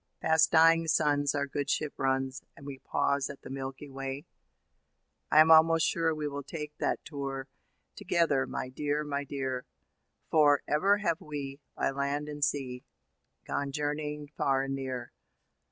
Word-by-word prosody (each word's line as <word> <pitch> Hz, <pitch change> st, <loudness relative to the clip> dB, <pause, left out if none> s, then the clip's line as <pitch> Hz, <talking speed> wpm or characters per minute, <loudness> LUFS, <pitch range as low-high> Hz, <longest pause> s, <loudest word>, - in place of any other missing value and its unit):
Past 160 Hz, 0 st, +4 dB
dying 165 Hz, 0 st, +5 dB
suns 145 Hz, -2 st, +2 dB
our 140 Hz, 0 st, 0 dB
good 140 Hz, 0 st, -3 dB
ship 150 Hz, -2 st, 0 dB
runs, 135 Hz, -1 st, -1 dB, 0.2 s
And 140 Hz, -, -12 dB
we 140 Hz, -2 st, -7 dB
pause 140 Hz, 0 st, 0 dB
at 140 Hz, -, -10 dB
the -, -, -9 dB
Milky 135 Hz, +1 st, -6 dB
Way.' 135 Hz, +2 st, -6 dB, 1.0 s
I 155 Hz, -, +5 dB
am 160 Hz, +1 st, +6 dB
almost 160 Hz, 0 st, +6 dB
sure 165 Hz, -1 st, +1 dB
we 150 Hz, -1 st, -3 dB
will 145 Hz, 0 st, -4 dB
take 150 Hz, 0 st, -7 dB
that -, -, -1 dB
tour 135 Hz, -2 st, -5 dB, 0.5 s
Together, 170 Hz, -8 st, +1 dB
my 130 Hz, -, -4 dB
dear, 145 Hz, +3 st, -1 dB
my 145 Hz, -1 st, -2 dB
dear. 130 Hz, -3 st, -4 dB, 0.6 s
For, 145 Hz, -3 st, +5 dB
ever 195 Hz, +7 st, +3 dB
have 170 Hz, -6 st, -1 dB
we, 140 Hz, -2 st, -6 dB, 0.2 s
by -, -, 0 dB
land 140 Hz, +2 st, -2 dB
and 145 Hz, -1 st, -4 dB
sea, 130 Hz, -3 st, -1 dB, 0.6 s
Gone 140 Hz, -1 st, -2 dB
journeying 150 Hz, 0 st, -3 dB
far 135 Hz, -1 st, +1 dB
and 135 Hz, 0 st, -3 dB
near. 130 Hz, -2 st, -4 dB
145 Hz, 155 wpm, -30 LUFS, 135-150 Hz, 1.0 s, am